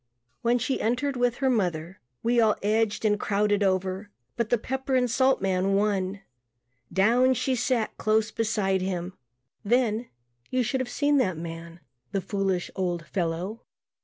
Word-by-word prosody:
When 240 +1 +3
she 250 +3 -1
entered 255 +5 0
with 245 -1 +1
her 265 0 +1
mother 180 -5 -1 0.2
we 235 0 +3
all 215 -2 +4
edged 215 +1 +1
and 210 -1 +2
crowded 205 0 +1
over 190 +1 0 0.3
but 235 -2 -1
the 240 - +3
pepper 265 +3 -2
and 250 -1 +3
salt 260 0 +2
man 190 +1 +1
won. 200 -1 0 0.7
Down 240 +8 +4
she 260 +2 0
sat 245 -2 0
close 215 0 +2
beside 210 -4 0
him. 185 -1 -3 0.5
Then 235 +1 +1 0.4
you 255 -1 +1
should 265 +3 -1
have 250 - -4
seen 290 +2 +2
that 185 - +1
man, 165 +1 -8 0.3
the 195 - +1
foolish, 195 -2 -1
old 175 -3 -2
fellow. 180 +5 -3
210 Hz, 155 wpm, -26 LUFS, 190-245 Hz, 0.7 s, all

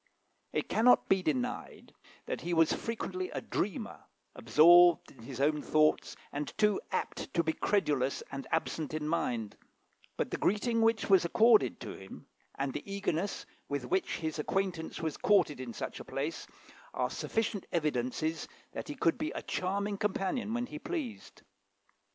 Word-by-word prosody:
It - - -1
cannot 245 +3 +4
be 195 -1 +4
denied 140 -8 -3 0.3
that - - -4
he 175 +1 -1
was 165 -1 +4
frequently 370 +11 -3
a - - -4
dreamer, - - -3 0.3
absorbed 175 +2 +6
in 130 - -16
his 135 -1 -7
own 150 +2 +2
thoughts, 155 +1 +2 0.2
and 145 +1 -4
too 210 -2 +3
apt - - -3
to 170 - +3
be 160 0 0
credulous 145 -10 0
and 135 0 -6
absent 160 -1 -1
in 150 -1 -2
mind; 120 -9 -1 0.6
but - - -1
the - - -1
greeting 230 +3 +1
which 225 0 +2
was 190 -3 +6
accorded 220 +6 +4
to 110 - -6
him, 95 0 -11 0.3
and 135 -1 -2
the 195 - -6
eagerness 200 -1 -2 0.2
with 140 -3 -2
which 190 +10 0
his 160 -1 -3
acquaintance 180 0 -2
was 160 -2 -2
courted 185 -9 +3
in 130 -2 -5
such - - -5
a - - -7
place, - - -4 0.5
are - - 0
sufficient 220 -3 -2
evidences 155 0 -1 0.2
that - - -6
he 145 - -5
could 165 - +1
be 310 +1 -1
a - - -5
charming 200 +2 -2
companion 210 +3 -1
when 245 0 -1
he 300 +4 -8
pleased. 305 -8 -6
170 Hz, 160 wpm, -31 LUFS, 150-210 Hz, 0.6 s, absorbed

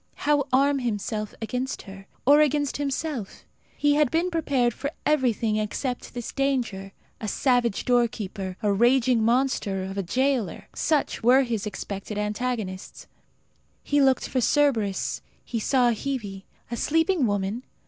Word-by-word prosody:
How 290 -1 +1
arm 275 +2 +3
himself 215 -3 -3
against 250 +4 -3
her 195 -1 -11 0.2
or 290 +3 +7
against 290 -1 +1
himself? 280 -5 -4 0.3
He 290 0 +3
had 295 -2 +3
been 340 +5 0
prepared 270 -8 +1
for 280 - -4 0.2
everything 240 -7 +1
except 240 +4 -3
this 240 -2 -5
danger. 245 -8 -1 0.3
A 215 - -4
savage 245 -2 +1
doorkeeper, 215 -6 0
a 205 -1 +3
raging 240 +2 +3
monster 230 -5 +1
of 195 +1 -4
a - - +2
jailer 255 +3 -1
such 305 -3 0
were 255 +4 +5
his 225 -4 -2
expected 205 0 -6
antagonists. 210 -2 -3 0.8
He 290 0 +2
looked 265 -1 +3
for 255 - 0
Cerberus; 230 -8 +1 0.2
he 230 - -3
saw 245 +1 +3
Hebe. 215 -6 -4 0.3
A 235 - -2
sleeping 325 -1 +2
woman! 205 +3 -1
245 Hz, 140 wpm, -25 LUFS, 210-275 Hz, 0.8 s, or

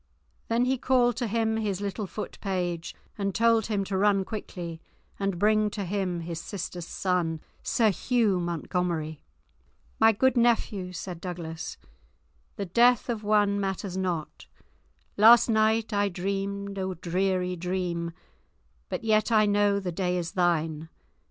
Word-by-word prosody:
Then 235 +2 +2
he 260 0 0
called 245 -2 +3
to 240 - -1
him 220 0 0
his 205 -4 -1
little 200 0 -3
foot 210 - -7
page 175 -4 -2 0.2
and 195 -1 -1
told 230 -1 +3
him 205 -3 0
to 195 0 -4
run 195 0 +3
quickly 175 -6 -6 0.4
and 195 -2 -1
bring 215 +2 +3
to 205 -1 -4
him 180 -2 -2
his 165 0 -5
sister's 175 -2 -6
son, 175 -4 -1 0.2
Sir 220 -3 +2
Hugh 220 -2 +1
Montgomery. 170 -2 -2 0.8
"My 225 0 +7
good 260 +5 +2
nephew," 225 -6 +1
said 175 -1 -6
Douglas, 170 -3 -6 0.8
"the 200 - -3
death 240 +6 +3
of 225 -3 -2
one 205 -1 +3
matters 195 -1 -3
not; 180 -5 -3 0.7
last 230 +3 +7
night 220 0 +2
I 205 0 +2
dreamed 195 +2 -3
a 190 -1 -2
dreary 180 +1 -1
dream, 175 -1 -2 0.8
but - - -4
yet 215 +1 +2
I 215 -1 +5
know 205 -1 +3
the 185 -2 -3
day 180 +1 -1
is 170 -2 -3
thine. 165 -3 0
195 Hz, 145 wpm, -27 LUFS, 180-215 Hz, 0.8 s, My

